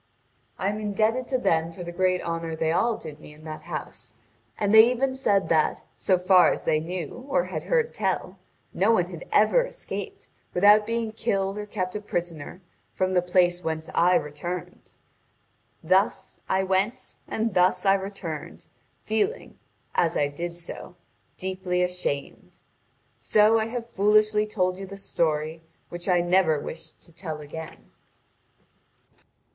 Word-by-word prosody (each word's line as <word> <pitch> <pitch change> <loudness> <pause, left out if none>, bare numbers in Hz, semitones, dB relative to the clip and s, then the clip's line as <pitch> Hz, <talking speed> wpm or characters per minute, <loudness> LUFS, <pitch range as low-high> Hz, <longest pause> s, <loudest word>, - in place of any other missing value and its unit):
I 195 - 0
am 210 +1 -3
indebted 215 +4 0
to 260 - +1
them 165 -8 +1
for 175 +1 -8
the 175 - -6
great 185 +1 +1
honour 165 -1 -3
they 160 0 0
all 230 +7 +1
did 155 -2 -9
me 150 - -13
in 155 - -17
that 155 -1 -7
house; - - -7 0.4
and 205 0 +1
they 220 +2 +9
even 260 +2 0
said 205 -7 +1
that, 160 -2 +2
so 185 - +2
far 180 0 +5
as - - -3
they 155 - +2
knew 180 - -6
or - - +2
had - - -4
heard 475 -2 +1
tell, - - -2 0.3
no 200 +4 +3
one 180 -4 +1
had 170 -1 -8
ever 215 - +4
escaped, - - -7 0.3
without 205 +3 +6
being 230 -1 -1
killed 195 -3 -1
or 210 - -6
kept 185 -2 -3
a 210 - -3
prisoner, 175 -3 -5 0.3
from 185 0 0
the 180 - +4
place 175 0 +2
whence 160 0 -3
I 180 +2 +4
returned. 165 +4 -4 0.9
Thus 190 +2 +1
I 190 0 +2
went 195 +7 -1
and 220 -1 -1
thus 180 +1 +3
I 195 - +6
returned, 190 -5 -5 0.4
feeling, 220 - -2 0.3
as 170 0 +1
I 145 -1 +2
did 170 +4 -5
so, 175 +1 -8 0.4
deeply 185 -1 -1
ashamed. 180 -6 -4 0.6
So 215 +1 +4
I 220 - -1
have 235 0 -4
foolishly 210 0 +3
told 185 -3 -1
you 195 - -6
the 200 +1 -9
story 160 -3 -1 0.3
which 175 +2 -6
I 175 -1 +4
never 175 -3 +3
wished 160 +3 -9
to - - -19
tell 160 -2 -6
again." 155 +2 -9
185 Hz, 155 wpm, -26 LUFS, 170-210 Hz, 0.9 s, they